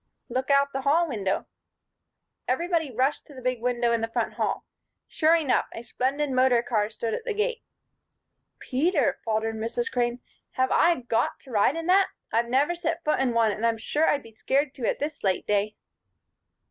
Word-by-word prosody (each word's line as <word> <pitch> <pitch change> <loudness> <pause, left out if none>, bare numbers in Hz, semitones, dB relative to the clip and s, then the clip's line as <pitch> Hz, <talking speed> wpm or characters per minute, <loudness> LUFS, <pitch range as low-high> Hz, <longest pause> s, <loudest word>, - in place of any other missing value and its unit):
"Look 255 +3 -2
out 280 0 +3
the 270 - -2
hall 310 +6 +3
window." 200 -8 -2 1.0
Everybody 330 +3 0
rushed 260 +4 -1
to 290 - -14
the 260 - -9
big 255 -2 -1
window 240 -1 +1
in 230 -1 +1
the 225 - 0
front 225 - -2
hall. - - -2 0.4
Sure 320 +1 +3
enough! 305 -6 +1
A 230 - -7
splendid 275 +4 -1
motor 255 -2 +3
car 215 -4 0
stood 225 0 -4
at - - -3
the 455 -4 -3
gate. 460 +2 -1 1.0
"Peter," 285 - 0
faltered 220 0 -1
Mrs. 345 - -2
Crane, 240 0 0 0.3
"have 260 0 +1
I 340 -6 +3
got 235 -2 -1
to 265 - -14
ride 215 +6 +3
in 330 0 -4
that? 375 +2 +4 0.3
I've 235 +1 +1
never 280 +7 +2
set 335 0 -3
foot 305 - +1
in 260 -3 +1
one, 225 -2 +4
and 210 +2 -5
I'm 230 -1 +2
sure 295 +8 0
I'd 285 - +1
be 230 - -14
scared 270 +5 0
to 250 -5 -3
at - - -1
this 295 0 -4
late 190 -2 0
day." 210 +1 0
260 Hz, 190 wpm, -26 LUFS, 230-305 Hz, 1.0 s, that